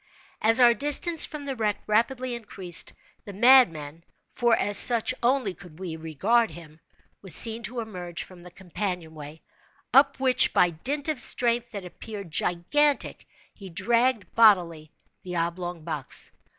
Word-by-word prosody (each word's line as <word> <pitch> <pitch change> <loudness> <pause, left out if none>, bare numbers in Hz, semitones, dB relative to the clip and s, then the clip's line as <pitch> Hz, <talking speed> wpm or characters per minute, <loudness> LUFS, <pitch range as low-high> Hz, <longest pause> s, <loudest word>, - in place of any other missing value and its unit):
As 225 +3 +5
our 240 -1 +6
distance 295 +5 +4
from 300 -2 -9
the 275 -1 -4
wreck 215 -3 -2
rapidly 240 +4 -1
increased, 195 -7 -5 0.3
the 205 - -10
madman 170 - +3 0.3
(for 235 -1 +2
as 205 - 0
such 230 +2 +3
only 245 -5 0
could 175 -5 -16
we 180 -3 -7
regard 190 +9 0
him) 160 -2 -14 0.4
was 190 -5 +2
seen 225 0 +4
to 235 +1 -5
emerge 180 -6 -7
from 180 -2 -15
the 180 - -13
companion—way, 170 -5 -7 0.5
up 275 +1 +4
which 255 -1 +2
by 175 -1 +3
dint 275 - -2
of 310 -5 -2
strength 240 0 +2
that 200 -3 -7
appeared 200 0 -10
gigantic, 270 - -1 0.3
he 195 -2 -12
dragged, 235 +4 -1
bodily, 175 -8 +3 0.3
the 180 -1 -8
oblong 170 0 -4
box. 155 -4 -3
205 Hz, 145 wpm, -25 LUFS, 175-240 Hz, 0.5 s, our